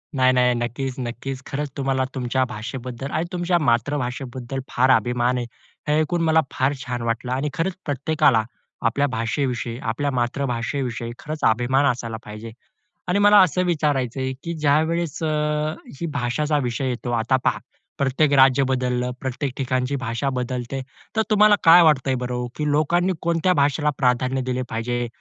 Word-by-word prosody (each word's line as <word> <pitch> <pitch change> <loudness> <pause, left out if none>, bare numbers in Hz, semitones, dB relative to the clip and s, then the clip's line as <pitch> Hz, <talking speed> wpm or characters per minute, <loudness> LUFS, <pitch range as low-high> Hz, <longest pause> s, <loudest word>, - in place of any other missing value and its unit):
नाही, 130 -1 +4
नाही. 125 -1 +3
नक्कीच, 125 +2 -3
नक्कीच. 130 +2 -5
खरंच 145 +1 -3
तुम्हाला 135 -1 0
तुमच्या 130 +1 0
भाषेबद्दल 125 +4 -6
आणि 165 - -1
तुमच्या 175 0 +1
मातृभाषेबद्दल 130 -1 -1
फार 130 +2 +2
अभिमान 125 0 +2
आहे. 120 - -2 0.4
हे 150 +1 +2
ऐकून 165 +2 0
मला 160 0 +4
फार 135 +2 +1
छान 120 -1 -3
वाटलं. 115 +2 -2
आणि 135 +3 -1
खरंच 180 +2 -1
प्रत्येकाला 140 -4 +2 0.4
आपल्या 140 +5 +1
भाषेविषयी, 120 0 -2
आपल्या 140 +5 -2
मातृभाषेविषयी 120 -1 -2
खरंच 155 0 -6
अभिमान 130 +5 +1
असायला 115 -2 -5
पाहिजे. 105 +2 -8 0.6
आणि 190 +3 +2
मला 205 0 +6
असं 185 0 +2
विचारायच 145 -7 0
आहे, 130 0 -1
की 170 - -3
ज्यावेळेस 160 +2 0
अ, 155 - +1 0.7
ही 170 - -2
भाषाचा 145 +4 0
विषय 130 +2 -2
येतो, 120 0 -4
आता 125 +4 +2
पहा - - +2 0.4
प्रत्येक 140 +2 +2
राज्य 135 0 +5
बदललं, 125 -1 0
प्रत्येक 130 +1 -3
ठिकाणची 130 0 -1
भाषा 115 +4 -2
बदलते. 125 +1 -3 0.3
तर 220 - +3
तुम्हाला 210 0 +6
काय 170 +1 +9
वाटतं 145 -4 +3
आहे 130 - +2
बरं 125 0 -4
हो, 125 0 -2
की 150 -1 -1
लोकांनी 175 +5 +2
कोणत्या 170 +2 +2
भाषेला 145 0 +2
प्राधान्य 130 0 +1
दिले 130 0 -2
पाहिजे? 120 +2 -2
130 Hz, 155 wpm, -22 LUFS, 125-150 Hz, 0.7 s, काय